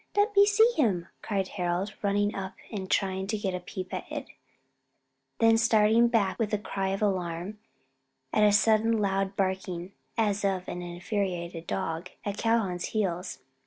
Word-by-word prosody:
Let 410 +1 +3
me 400 0 +7
see 440 +3 +5
him," 195 - +1
cried 195 -3 -1
Harold, 180 +2 -2
running 205 0 +1
up 190 -1 -5 0.2
and 190 -4 -5
trying 190 -1 0
to 215 +1 -1
get 195 -3 -2
a 180 - -2
peep 185 +1 -7
at - - -5
it; - - -4 1.1
then 225 0 +5
starting 225 +1 +5
back 220 -4 +1
with 220 -2 0
a - - 0
cry 195 -1 -3
of 195 +2 -1
alarm, 185 0 -2 0.7
at - - +3
a 210 - +6
sudden 220 +2 +4
loud 195 -1 0
barking, 190 -2 -2 0.3
as 210 -2 +1
of 190 -2 0
an 180 - -4
infuriated 175 -1 -3
dog, 170 -1 -3 0.2
at 205 -1 -2
Calhoun's 220 -7 +1
heels. 180 -9 -2
195 Hz, 160 wpm, -28 LUFS, 185-215 Hz, 1.1 s, me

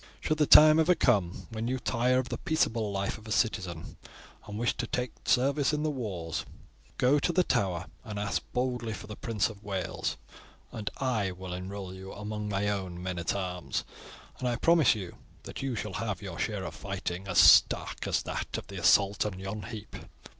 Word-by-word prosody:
Should 155 0 -1
the 150 - +4
time 155 +1 +9
ever 175 +3 +4
come 100 - +1
when 110 +1 -3
you 130 +1 0
tire 125 0 +1
of 130 0 -1
the - - -4
peaceable 115 -9 0
life 100 +2 -2
of 110 - -14
a - - -7
citizen 95 -8 -1 0.5
and 105 0 -6
wish 120 +1 0
to 120 - -2
take 125 0 -2
service 140 +3 +2
in 150 0 0
the 155 - +1
wars, 95 - -4 0.5
go 135 +4 +4
to 175 - +1
the 180 +2 +3
Tower 90 - 0 0.2
and 105 -4 -6
ask 105 0 -1
boldly 125 -3 -1
for 105 - -8
the 105 0 -8
Prince 110 -4 0
of 105 -2 -11
Wales, 95 -3 -3 0.5
and 105 -2 -4
I 120 -7 0
will 90 0 -7
enroll 95 +1 -6
you 95 +1 -9
among 105 0 -5
my 100 0 0
own 95 -3 -3
men 90 -1 -3
at 85 - -1
arms, 90 -3 -3 0.6
and 125 - -1
I 120 - +1
promise 165 -5 +4
you 95 -5 -7 0.3
that - - -7
you 135 -2 -2
shall 105 -3 -4
have 105 -5 -3
your 95 -3 -7
share 105 -3 -2
of - - -5
fighting 95 -1 -5
as 95 -3 -2
stark - - +6
as - - +1
that - - -4
of - - -6
the - - -7
assault 100 0 +4
of 100 -3 -4
yon 95 +2 -5
heap. 110 -2 -8
105 Hz, 200 wpm, -29 LUFS, 95-125 Hz, 0.6 s, time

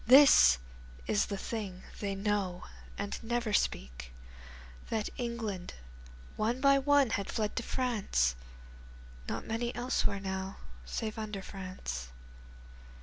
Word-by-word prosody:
This 255 - +9 0.5
is 205 - +2
the 200 - -3
thing 195 -3 -5 0.2
they 200 -1 -2
know 195 -3 -1 0.3
and 200 0 -3
never 235 -1 -1
speak, 60 - -1 0.8
That 220 -2 -1
England 225 -7 -4 0.6
one 230 +4 0
by 275 0 +6
one 280 -3 +4
had 200 -3 -1
fled 215 -2 -1
to - - +2
France 210 - +1 1.0
(Not - - -3
many 235 +2 -2
elsewhere 240 -5 0
now 190 0 -4 0.3
save 215 - -3
under 210 -3 -4
France). 185 - -5
210 Hz, 115 wpm, -32 LUFS, 190-235 Hz, 1.0 s, This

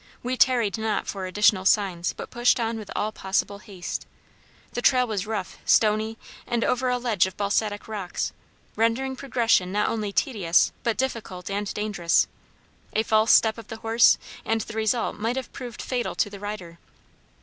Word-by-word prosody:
We 250 +1 -1
tarried 235 -5 +3
not 220 -2 -1
for 190 -2 -4
additional 200 0 +3
signs, 190 -4 +2
but - - -9
pushed 240 +1 +3
on 225 -1 -1
with 210 - -9
all 215 - 0
possible 200 0 -1
haste. 195 -5 -6 0.7
The 245 - -2
trail 255 -1 +4
was 210 -3 -3
rough, 210 -4 -4
stony, 220 +1 +3 0.3
and 235 -1 0
over 250 +1 +1
a 250 - +1
ledge 225 -7 +2
of 190 - -10
basaltic 205 +1 -1
rocks, 200 -5 -3 0.4
rendering 235 +4 +1
progression 230 -8 +1
not 210 +1 +1
only 215 -3 -2
tedious 195 -8 +2
but 230 -2 0
difficult 215 -8 -3
and 200 0 -2
dangerous; 205 -5 +2 0.7
a 220 - +2
false 220 0 +3
step 220 0 +5
of 225 - -11
the 225 - -7
horse, 225 +1 +6 0.3
and 225 0 0
the 220 - -7
result 220 +1 0
might 230 +3 -1
have 265 -2 -5
proved 245 -4 -7
fatal 250 -2 -2
to 205 - 0
the 200 - -9
rider. 190 -5 -7
215 Hz, 170 wpm, -25 LUFS, 200-235 Hz, 0.7 s, horse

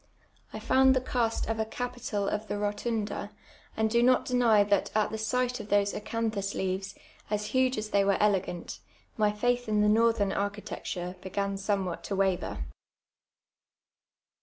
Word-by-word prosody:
I - - -6
found 265 0 +4
the - - +3
cast 240 -3 -1
of 225 0 -2
a - - +2
capital 240 -3 -3
of 210 +2 -2
the 205 +1 -2
Rotunda, 205 0 -2 0.5
and 220 0 +2
do 235 +2 +2
not 255 +1 +4
deny 235 -5 +4
that 200 -1 +1
at 215 -1 +2
the 220 - -4
sight 250 +2 0
of 215 -1 -8
those 205 0 +2
acanthus 215 -2 -2
leaves, 190 +1 -2 0.3
as 210 0 -1
huge 260 -1 +2
as 215 0 -4
they 200 -1 +4
were 195 -1 +2
elegant, 195 -4 0 0.4
my 210 -1 +2
fiiith 245 +3 0
in 210 -1 +2
the 210 - +4
northern 225 -2 +3
architecture 195 -3 -4
began 200 +1 -2
somewhat 195 -3 -2
to 200 - -2
waver. 185 - 0
210 Hz, 160 wpm, -29 LUFS, 200-230 Hz, 0.5 s, found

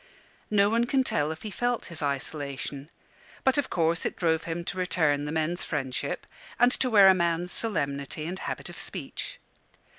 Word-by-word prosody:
No 200 -1 +4
one 230 +3 +2
can 265 +2 +2
tell 150 - 0
if 160 - -7
he 215 - -4
felt 245 +3 -1
his 170 -2 -7
isolation; 140 0 -3 0.5
but 265 +2 +4
of 285 - -1
course 165 0 +1
it - - -2
drove 160 -2 +1
him 170 +1 -3
to 185 - -4
return 155 -5 +2
the 150 - -3
men's 160 +2 0
friendship, 130 -4 -3 0.3
and 245 +1 +5
to 255 - +1
wear 205 -4 +8
a 190 - +9
man's 170 0 +1
solemnity 140 - -1
and 180 +3 -4
habit - - -4
of - - -8
speech. - - -5
170 Hz, 180 wpm, -28 LUFS, 150-205 Hz, 0.5 s, a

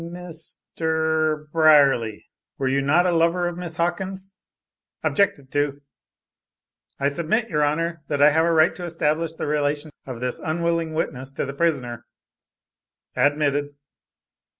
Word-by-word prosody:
Mist 170 -1 -8 0.2
er.....er 160 -1 +1
Brierly! 140 -9 +4 0.3
Were 135 - -1
you 135 +1 +1
not 155 +6 +3
a 180 - +3
lover 170 +1 +2
of 175 - -4
Miss 175 -2 -5
Hawkins?" 190 +3 -3 0.7
Objected 175 -10 +1
to. 145 0 -1 1.2
"I 140 - +2
submit, 170 +11 0
your 150 -3 0
Honor, 165 +3 -1
that 145 -2 -2
I 145 +1 +7
have 160 +2 +3
the - - +2
right 160 +1 +4
to 180 - -7
establish 165 -1 -1
the - - -4
relation 150 +1 -1 0.2
of 125 -3 -6
this 125 0 -3
unwilling 165 0 -1
witness 130 -4 -3
to - - -2
the 140 - -5
prisoner." 125 -7 -1 1.1
Admitted. 145 0 +1
155 Hz, 140 wpm, -23 LUFS, 145-170 Hz, 1.2 s, I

